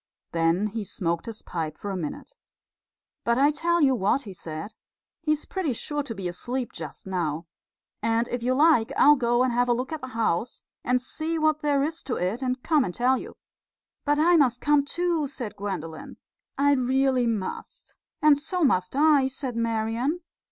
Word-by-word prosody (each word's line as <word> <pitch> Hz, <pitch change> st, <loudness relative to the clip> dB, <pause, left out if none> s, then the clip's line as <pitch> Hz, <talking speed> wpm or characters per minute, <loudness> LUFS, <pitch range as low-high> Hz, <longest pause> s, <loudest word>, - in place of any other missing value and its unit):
Then 165 Hz, +4 st, +2 dB
he 215 Hz, +1 st, -3 dB
smoked 170 Hz, 0 st, -3 dB
his 225 Hz, -2 st, -7 dB
pipe 160 Hz, -3 st, -4 dB
for 205 Hz, -, -5 dB
a -, -, -3 dB
minute. 180 Hz, -, -6 dB, 0.9 s
"But 235 Hz, 0 st, +2 dB
I 285 Hz, +2 st, +5 dB
tell 340 Hz, +2 st, +1 dB
you 265 Hz, -2 st, +5 dB
what," 245 Hz, +4 st, +1 dB
he 200 Hz, -, -8 dB
said. 160 Hz, +4 st, -7 dB, 0.5 s
"He's 305 Hz, -2 st, 0 dB
pretty 365 Hz, -8 st, -2 dB
sure 295 Hz, +5 st, -2 dB
to 245 Hz, -6 st, -6 dB
be 190 Hz, -2 st, -4 dB
asleep 245 Hz, +8 st, -4 dB
just 155 Hz, -4 st, -8 dB
now. 170 Hz, -4 st, -2 dB, 0.6 s
And 230 Hz, +1 st, +1 dB
if 245 Hz, -, -3 dB
you 255 Hz, +2 st, +1 dB
like 290 Hz, -6 st, +4 dB
I'll 295 Hz, -, +7 dB
go 240 Hz, -2 st, +2 dB
and 255 Hz, -2 st, +1 dB
have 245 Hz, +1 st, +2 dB
a -, -, +5 dB
look 250 Hz, +4 st, -3 dB
at 315 Hz, -, -4 dB
the 255 Hz, -, -5 dB
house, 225 Hz, +1 st, -1 dB, 0.2 s
and 250 Hz, 0 st, +2 dB
see 315 Hz, +6 st, -3 dB
what 310 Hz, -1 st, +2 dB
there 285 Hz, -2 st, +1 dB
is 320 Hz, +3 st, -3 dB
to 245 Hz, -, -2 dB
it, 190 Hz, +8 st, -2 dB
and 255 Hz, -1 st, -2 dB
come 310 Hz, -4 st, +3 dB
and 180 Hz, -, -4 dB
tell 255 Hz, +2 st, +2 dB
you." -, -, -9 dB, 0.7 s
"But 290 Hz, 0 st, +2 dB
I 340 Hz, +3 st, +5 dB
must 250 Hz, -5 st, +3 dB
come 295 Hz, -1 st, +3 dB
too," 335 Hz, -1 st, 0 dB
said 245 Hz, -6 st, -6 dB
Gwendolen. 180 Hz, -6 st, -6 dB, 0.4 s
"I 285 Hz, +1 st, +4 dB
really 260 Hz, -1 st, +2 dB
must." 215 Hz, -5 st, -5 dB, 0.3 s
"And 300 Hz, -2 st, +6 dB
so 345 Hz, +4 st, -2 dB
must 185 Hz, -7 st, +2 dB
I," 290 Hz, -2 st, +5 dB
said 265 Hz, -2 st, -5 dB
Marian. 230 Hz, +7 st, -1 dB
250 Hz, 185 wpm, -26 LUFS, 210-290 Hz, 0.9 s, I'll